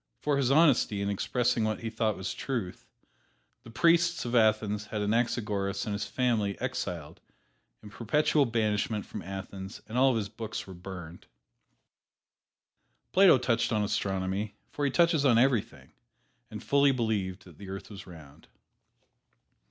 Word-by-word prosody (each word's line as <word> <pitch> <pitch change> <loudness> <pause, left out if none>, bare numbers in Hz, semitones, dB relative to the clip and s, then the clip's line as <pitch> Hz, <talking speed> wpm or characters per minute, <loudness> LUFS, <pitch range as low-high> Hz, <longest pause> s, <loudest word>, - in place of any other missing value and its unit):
For 145 -1 0
his 135 -3 +1
honesty 135 -8 +4
in 100 - -1
expressing 120 +3 0
what 110 0 -1
he 115 -1 -4
thought 110 -2 -1
was 95 - -4
truth, 115 -10 -5 0.7
the - - -13
priests 170 +5 +2
of 120 - -4
Athens 110 -2 +2
had 105 - -4
Anaxagoras 105 -3 -1
and 105 - -3
his 100 +1 -2
family 115 -6 0
exiled - - -4 0.6
to 105 - -10
perpetual 140 +6 +1
banishment 110 -2 -1
from 105 - -7
Athens 95 0 -7
and 115 +3 -2
all 135 +1 +6
of 130 - +1
his 105 -2 -2
books 110 +1 -6
were 95 - -10
burned. 90 -2 -10 1.8
Plato 190 -6 +7
touched 120 -1 0
on 105 -2 +1
Astronomy, 95 +1 -2 0.2
for 145 - -2
he - - +2
touches 165 0 +3
on 125 -5 +4
everything, 120 -3 0 0.6
and 105 -1 -8
fully 140 0 +4
believed 105 -7 -2
that 85 -4 -16
the 100 -1 -9
earth 95 +3 -7
was 100 -1 -10
round. 75 -5 -14
110 Hz, 150 wpm, -29 LUFS, 100-125 Hz, 1.8 s, Plato